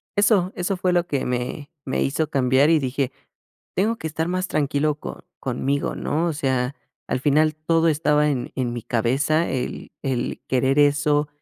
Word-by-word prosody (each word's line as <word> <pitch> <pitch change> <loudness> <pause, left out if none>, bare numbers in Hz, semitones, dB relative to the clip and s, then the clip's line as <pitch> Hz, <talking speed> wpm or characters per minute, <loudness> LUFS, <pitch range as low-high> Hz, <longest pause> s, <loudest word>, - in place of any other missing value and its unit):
eso 205 -3 +3
eso 185 +2 -1
fue 180 0 +1
lo 175 0 +2
que 140 -2 -1
me 125 +4 -3 0.2
me 130 - -1
hizo 145 +3 0
cambiar 135 +1 +3
y 165 -1 +5
dije, 135 0 -1 0.6
tengo 220 +5 +1
que 160 - -4
estar 160 +1 -2
más 185 +1 -1
tranquilo 150 -1 +1
co 150 - -9
conmigo, 135 +2 -1
¿no? 160 +3 -1
O 165 - -1
sea, 130 -2 -1 0.3
al 125 - -1
final 155 +2 +3
todo 165 +1 +2
estaba 150 -1 +2
en 130 -4 -2
en 125 -2 -1
mi 120 - -4
cabeza, 135 +9 +1
el 130 -2 -4
el 130 -3 -2
querer 130 +2 +2
eso 145 +1 +3
145 Hz, 175 wpm, -23 LUFS, 130-160 Hz, 0.6 s, y